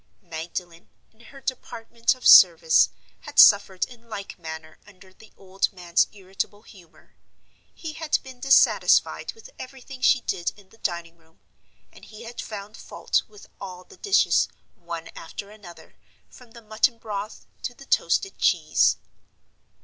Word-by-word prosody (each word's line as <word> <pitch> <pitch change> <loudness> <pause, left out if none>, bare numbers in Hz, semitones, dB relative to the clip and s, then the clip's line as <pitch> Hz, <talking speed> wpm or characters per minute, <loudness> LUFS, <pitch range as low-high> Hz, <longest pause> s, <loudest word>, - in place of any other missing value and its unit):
Magdalen, 170 +1 -7 0.2
in 220 - -32
her 275 - -14
department 235 -2 -2
of 255 - -14
service, 485 -1 +7 0.3
had - - -12
suffered 200 -3 +6
in 235 -2 -17
like 200 -3 -8
manner 160 -1 -9
under 190 -2 -18
the 220 +3 -19
old 195 0 -2
man's 175 -3 +1
irritable 200 +1 -6
humor: 170 -8 -19 0.6
he 320 -2 -7
had 315 -1 0
been 260 -1 -12
dissatisfied 270 +1 +3
with 450 +2 -15
everything 260 0 -10
she 255 -1 +4
did 175 -6 -3
in 200 -2 -19
the 225 - -22
dining 170 -2 -4
room; 160 0 -29 0.5
and - - -16
he 215 +1 -12
had 235 +1 -7
found 210 0 -9
fault - - -1
with 420 -2 -16
all 185 -2 -9
the 390 - -17
dishes, 400 0 +3 0.3
one 170 -1 -8
after 200 +5 -9
another, 175 -6 -14 0.4
from 250 -2 -16
the 235 0 -15
mutton 220 +3 +1
broth 210 -1 -7 0.2
to 245 - -5
the 275 - -14
toasted 390 +7 0
cheese. - - +3
205 Hz, 150 wpm, -24 LUFS, 180-245 Hz, 0.6 s, service